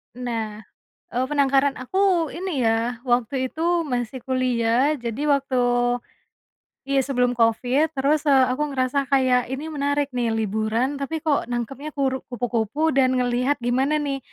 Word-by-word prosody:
Nah, 225 -4 -4 0.5
eee, 250 +2 0
penangkaran 275 -1 +2
aku 360 +3 +1
ini 350 -4 -3
ya 230 +2 0
waktu 250 +2 +1
itu 335 +3 -1
masih 245 -1 -3
kuliah 255 +1 +2
jadi 235 +3 -4
waktu, 275 -2 0 1.3
iya 275 0 0
sebelum 250 -2 +1
Covid 250 +7 +2
terus, 290 +3 +1
eee, 270 -2 +6
aku 295 +4 0
ngerasa 260 +1 0
kayak 255 -2 +2
ini 300 +4 -6
menarik 285 -1 -1
nih 240 -3 -1
liburan 220 +5 -1
tapi 305 +3 -4
kok 305 -4 +1
nangkepnya 245 +5 -5
kur 265 -2 -1
kupu-kupu 245 +5 -1
dan 260 -2 +3
ngelihat 250 +2 0
gimana 270 +5 +1
nih 275 -1 -2
260 Hz, 140 wpm, -23 LUFS, 245-285 Hz, 1.3 s, eee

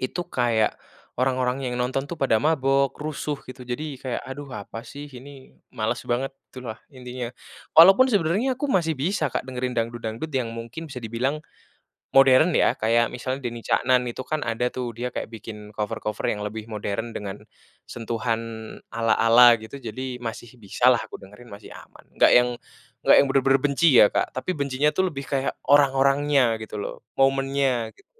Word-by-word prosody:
itu 130 +7 -3
kayak 115 -5 +1 0.4
orang-orang 130 +1 0
yang 125 0 -2
nonton 130 +2 -1
tuh 160 +2 -8
pada 130 -5 +3
mabok, 135 0 +2
rusuh, 150 -1 -4
gitu. 130 0 -9
Jadi, 140 +3 -5
kayak, 125 -1 -4
"Aduh 145 +2 -8
apa 115 +3 -8
sih 145 +4 -9
ini 135 0 -12 0.2
males - - -2
banget," 125 +3 -1 0.2
itulah, 125 -4 -7 0.2
intinya. 125 -1 -7 0.4
Walaupun 190 +9 +8
sebenarnya 205 +8 +1
aku 275 +3 -3
masih 170 -9 +2
bisa, 155 -1 -1
Kak, 130 - -3
dengerin 125 0 -3
dangdut-dangdut 115 +3 -3
yang 125 -5 -2
mungkin 115 +8 -7
bisa 125 - -6
dibilang 120 +6 -2 0.7
modern 135 +5 +6
ya. - - +3
Kayak 115 +1 +2
misalnya 130 +2 -4
Denny 120 -2 -6
Caknan 125 -1 +2
itu 120 +1 -5
kan 155 +2 -3
ada 120 +2 -1
tuh 125 -2 -5
dia 120 +2 -4
kayak - - -4
bikin 105 -1 -9
cover-cover 105 0 -3
yang 105 -1 -3
lebih 110 +1 -6
modern 110 +2 -4
dengan 100 -1 -7 0.5
sentuhan 115 0 -2 0.5
ala-ala 115 +1 +5
gitu, 115 +5 -10
jadi 125 +2 -6
masih 115 0 -7
bisalah 120 +4 +3
aku - - -9
dengerin, 105 +5 -15
masih 100 0 -11
aman. - - -15
Enggak - - +5
yang 125 0 +5 0.5
enggak - - +6
yang 140 - +5
bener-bener 135 0 +3
benci 145 +4 +3
ya, 105 - +8
Kak, - - -1
tapi 185 +8 -2
bencinya 140 0 0
tuh 190 -1 +1
lebih 140 -3 -7
kayak, 135 0 -2
orang-orangnya 140 -3 +3
gitu 110 -1 -7
loh, 100 - -6 0.2
momennya 135 -3 +1
gitu. 395 - -24
125 Hz, 165 wpm, -24 LUFS, 115-140 Hz, 0.7 s, Walaupun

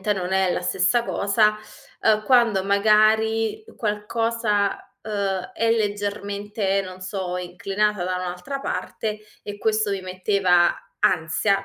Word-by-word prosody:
ovviamente 210 +2 +1
non 190 -2 -3
è 190 -1 +2
la - - -1
stessa 195 +6 +2
cosa, 210 0 +2 0.5
uhm, 215 -1 +3
quando 235 -6 +4
magari 215 +2 +3
qualcosa, 210 -1 0 0.3
uhm, 200 -3 -2
è 230 0 +1
leggermente, 205 -1 -1
non 185 -1 -9
so, 185 -1 -4
inclinata 195 +3 -1
da 185 0 -1
un'altra 180 +8 -4
parte, 215 -5 -4 0.2
e 205 - -6
questo 215 0 +1
mi 195 - -2
metteva 185 -1 +2 0.3
ansia, 190 +4 +2
205 Hz, 125 wpm, -23 LUFS, 190-215 Hz, 0.5 s, quando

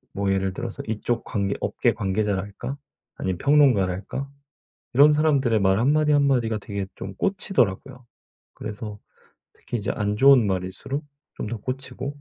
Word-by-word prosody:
뭐 100 0 0
예를 95 -1 0
들어서 120 +2 -5
이쪽 115 +2 -2
관계 100 -2 -1
업계 120 - +1
관계자랄까? 100 +4 -2 0.4
아니면 95 -2 -2
평론가랄까? 130 -3 +2 0.6
이런 145 +4 +7
사람들의 140 -8 +2
말 95 +1 +3
한마디 150 +5 +3
한마디가 135 -6 +2
되게 100 -2 -4
좀 95 0 -7
꽂히더라고요. 125 - -1 0.5
그래서 105 -1 -7 0.6
특히 - - -5
이제 105 - -3
안 105 0 -1
좋은 135 -2 +6
말일수록 95 +10 -3 0.3
좀 - - -4
더 115 - -3
꽂히고. 130 +3 -5
115 Hz, 330 characters per minute, -24 LUFS, 100-135 Hz, 0.6 s, 이런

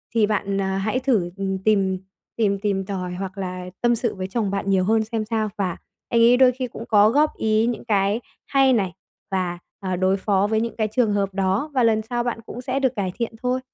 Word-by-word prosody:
thì 220 -2 +5
bạn, 200 -2 0
à, 190 0 -1
hãy 215 +6 0
thử, 230 -10 +1
ừm, 195 -1 -1
tìm 195 -3 +2 0.4
tìm 200 -3 +1
tìm 195 -2 -1
tòi 185 -3 -4
hoặc 190 +1 -6
là 185 -1 -4 0.2
tâm 240 0 +3
sự 230 -1 -2
với 185 -1 -4
chồng 205 0 -1
bạn 200 0 -2
nhiều 190 -1 +3
hơn 220 +3 +2
xem 220 0 -3
sao, 220 -1 -1
và 185 -4 -1 0.3
anh 230 -1 +3
ấy 240 +2 +6
đôi 260 -1 +6
khi 255 0 -4
cũng 230 0 -9
có 210 -1 +6
góp 295 +5 +2
ý 220 0 +2
những 240 -1 -3
cái 205 +1 +1 0.2
hay 270 -2 +4
này 190 -6 0 0.4
và, 180 -2 -1 0.2
ờ, 185 -2 -2
đối 190 +2 +2
phó 200 0 +1
với 220 0 +1
những 230 -2 -3
cái 215 -1 +1
trường 220 -2 +2
hợp 200 -1 0
đó 195 +9 0
và 255 -3 +2
lần 220 -1 +3
sau 240 +2 -2
bạn 240 -1 -2
cũng 245 - -7
sẽ 260 +1 -1
được 260 -2 +2
cải 190 -3 -1
thiện 235 -1 -3
thôi. 250 +1 +1
210 Hz, 235 wpm, -23 LUFS, 195-235 Hz, 0.4 s, ấy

